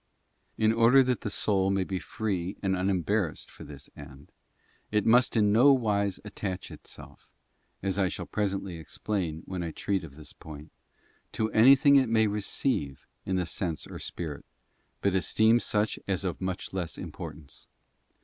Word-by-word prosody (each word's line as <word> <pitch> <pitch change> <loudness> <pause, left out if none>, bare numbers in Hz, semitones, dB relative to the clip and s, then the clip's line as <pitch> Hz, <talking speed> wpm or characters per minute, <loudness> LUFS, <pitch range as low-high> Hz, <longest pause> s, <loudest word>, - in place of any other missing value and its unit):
She - - -3
flesh - - +5
and 110 - +4
In 115 - -3
order 125 +4 +7
that 125 -2 -1
the - - -3
soul 95 -2 +1
may 95 -1 +1
be 95 0 -3
free 95 -4 -3
and 95 -1 +1
unembarrassed 95 0 -1
for - - -12
bothtobe - - -11
this 70 -2 -10
end, 70 -1 -13 0.6
it 105 -1 +1
must 120 +1 +4
in 105 -2 +4
no 125 +7 +6
wise 100 -6 0
attach 100 -3 -5
itself—as 95 0 -9
I 95 - +3
shall - - -4
pre 105 - -1
¥ - - +2
sently 90 -4 -7
explain 85 0 -3
when 95 -2 -4
I 85 - -3
treat 95 +3 -2
of 70 -4 -10
this 75 -1 -11
point—to 80 +7 -8
anything 135 +5 +7
it 130 -4 +3
may 110 -1 +4
receive 100 - -1 0.2
in 95 - 0
the 90 -1 0
sense 85 -1 -3
or - - -9
spirit, 80 -5 -6 0.6
but 100 - +1
esteem, 110 +5 +3
such 105 -2 0
as 95 -1 0
of 90 -2 -3
much 95 0 -4
less 90 -3 -3
importance. 75 -1 -9
95 Hz, 175 wpm, -28 LUFS, 85-110 Hz, 0.6 s, order